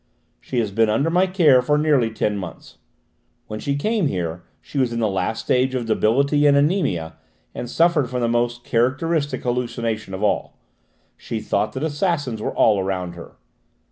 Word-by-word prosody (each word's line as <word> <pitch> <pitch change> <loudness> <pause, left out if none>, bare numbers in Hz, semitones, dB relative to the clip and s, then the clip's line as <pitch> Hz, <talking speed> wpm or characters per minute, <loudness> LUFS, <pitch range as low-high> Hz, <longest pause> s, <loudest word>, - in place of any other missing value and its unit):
She 130 - -6
has 110 -4 0
been 110 +2 +2
under 140 +10 +1
my 180 +2 +3
care 160 -9 +5
for 150 +4 +1
nearly 145 -6 +2
ten 105 -1 -1
months. 90 -5 -8 0.7
When 110 - -6
she 140 +4 -2
came 210 +4 0
here 85 -5 -3 0.2
she 140 - -5
was 130 -3 +1
in 115 - -3
the 110 - +2
last 95 +3 -2
stage 130 +1 +1
of 125 -2 -2
debility 140 +7 +2
and 140 -1 +5
anæmia 140 - +1 0.4
and 120 - -6
suffered 165 -4 +2
from 125 -1 -2
the 120 - +1
most 120 +1 0
characteristic 140 +4 0
hallucination 120 -4 -2
of 95 - -5
all: 105 - -1 0.6
she 115 - -5
thought 105 0 -1
that 130 - -4
assassins 145 - -1
were - - -2
all 105 -3 +4
round 90 -2 -3
her. 85 -1 -12
120 Hz, 175 wpm, -22 LUFS, 110-145 Hz, 0.7 s, care